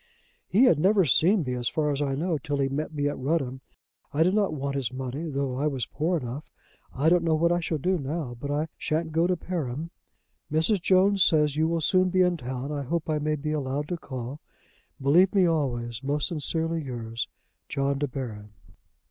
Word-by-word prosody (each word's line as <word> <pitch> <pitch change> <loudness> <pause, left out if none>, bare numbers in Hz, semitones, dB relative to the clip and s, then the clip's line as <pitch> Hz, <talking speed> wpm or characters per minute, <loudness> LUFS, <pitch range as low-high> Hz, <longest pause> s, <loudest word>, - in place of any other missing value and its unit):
"He 210 +7 +4
had 175 - +5
never 190 +2 +4
seen 175 - +4
me, 125 -2 -3
as 120 -1 -1
far 150 -2 0
as 140 0 -2
I 135 -2 0
know, 160 +1 -1
till 145 +1 -2
he 135 -1 +1
met 150 +3 -3
me 145 -2 -1
at 145 - -3
Rudham. 130 -2 -1 0.5
I 155 +3 +3
did 180 +3 +2
not 205 -3 +2
want 140 -2 -3
his 135 -3 -2
money, 130 +5 -4
though 140 -2 -2
I 145 +3 +1
was 135 -4 -2
poor 170 +4 -1
enough. 130 +1 -6 0.4
I 140 +5 0
don't 175 +1 +4
know 165 -1 +2
what 170 +2 +2
I 175 - +2
shall 165 -2 -2
do 180 +5 0
now; 140 -2 -4
but 140 - -5
I 150 +2 0
shan't 160 +1 -1
go 165 +2 +2
to 180 -1 +1
Perim. 160 -3 -4 0.6
"Mrs. 165 +6 +2
Jones 190 +1 +4
says 150 -2 +3
you 160 +1 +2
will 165 0 0
soon 185 +3 +3
be 185 +1 +2
in 180 -1 +3
town. 130 +1 -5
I 145 -1 -2
hope 160 +4 -2
I 155 - +1
may 155 +1 0
be 150 +1 -3
allowed 145 0 -2
to 175 - -1
call. 130 -2 -6 0.6
"Believe 175 +9 +4
me 190 -2 +5
always, 120 -8 -1
"Most 145 +1 -1
sincerely 165 +1 -1
yours, 115 -4 -4 0.4
"JOHN 140 +1 0
DE 145 - 0
BARON." 110 -6 -6
150 Hz, 210 wpm, -27 LUFS, 135-170 Hz, 0.6 s, had